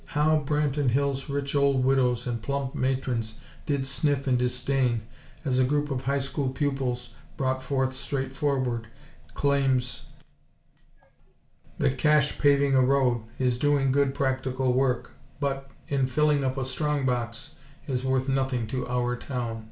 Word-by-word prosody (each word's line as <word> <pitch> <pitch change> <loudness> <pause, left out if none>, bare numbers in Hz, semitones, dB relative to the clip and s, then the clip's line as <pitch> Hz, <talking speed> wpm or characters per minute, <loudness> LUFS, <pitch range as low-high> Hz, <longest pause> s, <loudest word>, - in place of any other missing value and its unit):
How 155 +1 +4
Branton 145 -1 +1
Hills' 140 +2 0
rich 140 0 -2
old 140 -2 +3
widows 125 -2 +2
and 120 -2 -3
plump 140 +2 -2
matrons 125 -4 -1 0.3
did 140 -2 0
sniff 140 +1 0
in 130 - +3
disdain 125 -1 0 0.4
as 130 -2 +1
a - - +5
group 145 +2 0
of 130 -1 -3
High 140 +1 +1
School 135 0 -1
pupils 130 -3 -2 0.3
brought 130 -1 0
forth 130 -1 0
straightforward 135 -3 -2 0.5
claims 135 -3 +1 1.7
that 135 - 0
cash 150 -2 +3
paving 140 -1 +4
a 130 - +6
road, 130 -2 +3 0.2
is 125 -2 +1
doing 145 -2 +2
good 140 0 +2
practical 130 -1 0
work, 130 -2 +1 0.3
but, 135 -1 -2 0.2
in 135 -2 +1
filling 150 +1 +2
up 130 0 -1
a 135 - -1
strong 145 +1 -1
box, 120 0 -2 0.3
is 130 -2 -2
worth 130 0 +1
nothing 135 -3 0
to 125 +3 -3
our 125 0 0
town. 120 -3 -4
135 Hz, 145 wpm, -27 LUFS, 125-140 Hz, 1.7 s, a